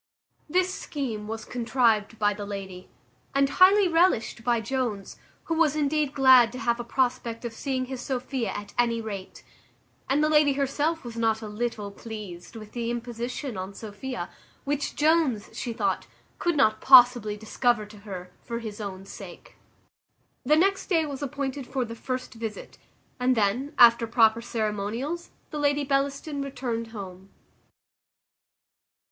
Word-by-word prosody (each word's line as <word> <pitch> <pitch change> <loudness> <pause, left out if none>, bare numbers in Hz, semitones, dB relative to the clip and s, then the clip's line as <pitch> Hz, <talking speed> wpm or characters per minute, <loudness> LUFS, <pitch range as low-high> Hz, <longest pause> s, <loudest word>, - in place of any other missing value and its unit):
This 370 +3 +2
scheme 245 - -4
was 225 +1 -5
contrived 230 -3 +1
by 205 -1 +2
the 205 0 -7
lady, 190 -2 -7 0.5
and 275 0 +4
highly 380 +6 +6
relished 330 -10 +2
by 240 0 +2
Jones, 225 -4 -3 0.3
who 330 - -2
was 320 -3 +3
indeed 295 -1 0
glad 260 -4 +7
to - - -6
have 235 -2 0
a - - -3
prospect 245 -1 -1
of 235 - -4
seeing 260 +2 -2
his 255 -1 -6
Sophia 255 -2 -2
at 205 0 -6
any 235 -1 +2
rate; 200 -4 -7 0.7
and 285 +3 +3
the - - +4
lady 300 -2 +4
herself 285 +4 -1
was 235 -2 -8
not 225 -1 +1
a - - -5
little 210 -1 -3
pleased 205 -4 -9
with 215 -2 -9
the 235 -1 -3
imposition 240 +1 -4
on 190 +2 -6
Sophia, 220 -1 -6 0.3
which 290 0 -2
Jones, 300 -8 +2
she 240 - -4
thought, 225 - -1 0.3
could 345 -3 0
not 215 -6 +3
possibly 245 -5 +7
discover 220 +1 0
to 210 0 -14
her 185 -3 -8
for 235 - -5
his 220 -2 -6
own 195 -2 -6
sake. - - -11 0.9
The 295 +4 +4
next 385 +4 +2
day 330 -4 +2
was 280 -2 -6
appointed 280 -1 -4
for 260 -3 -1
the 230 - -7
first 255 +2 -5
visit, 225 -2 -7 0.4
and 250 +1 +3
then, 240 +9 0
after 235 -1 +7
proper 225 -1 +4
ceremonials, 230 +8 -3 0.2
the 300 - -4
Lady 290 0 +2
Bellaston 280 +1 -1
returned 250 -4 -3
home. 195 -3 -9
240 Hz, 150 wpm, -26 LUFS, 220-275 Hz, 0.9 s, glad